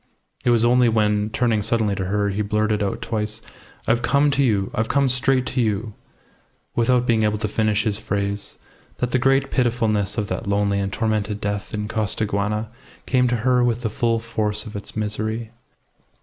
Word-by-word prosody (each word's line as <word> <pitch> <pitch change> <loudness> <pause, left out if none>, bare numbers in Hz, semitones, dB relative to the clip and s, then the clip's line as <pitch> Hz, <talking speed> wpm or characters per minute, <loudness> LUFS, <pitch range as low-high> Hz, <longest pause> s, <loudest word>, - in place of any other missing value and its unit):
It - - +2
was 120 -1 +4
only 125 0 +4
when, 105 -1 +1
turning 115 -1 +1
suddenly 110 -1 +1
to 95 -1 -2
her, 100 +2 0
he 100 +2 -1
blurted 105 0 0
out 100 -1 -2
twice, 105 -1 -2 0.5
"I've 115 +1 +2
come 140 +3 +3
to 140 0 +2
you 100 -6 +1
I've 110 - 0
come 140 -1 +3
straight 130 0 +2
to 130 - -1
you 110 -1 -1 0.4
," - - -39
without 125 +1 +3
being 115 -2 +2
able 105 0 +1
to 105 +1 -2
finish 105 0 +1
his 105 -2 -1
phrase, 100 -1 -2 0.4
that 125 -1 -1
the 130 - +2
great 135 +1 +2
pitifulness 115 -5 +1
of 105 - 0
that - - -4
lonely 100 0 +1
and 100 0 -2
tormented 105 -1 -1
death 100 -1 -3
in 105 0 -3
Costaguana 105 0 -1 0.4
came 125 -1 +2
to 120 - +1
her 125 -1 +4
with 120 -1 +1
the 110 -3 -2
full 115 +1 +1
force 110 -2 -2
of 110 - -9
its 100 - -7
misery. 110 +1 -3
110 Hz, 190 wpm, -22 LUFS, 105-120 Hz, 0.5 s, was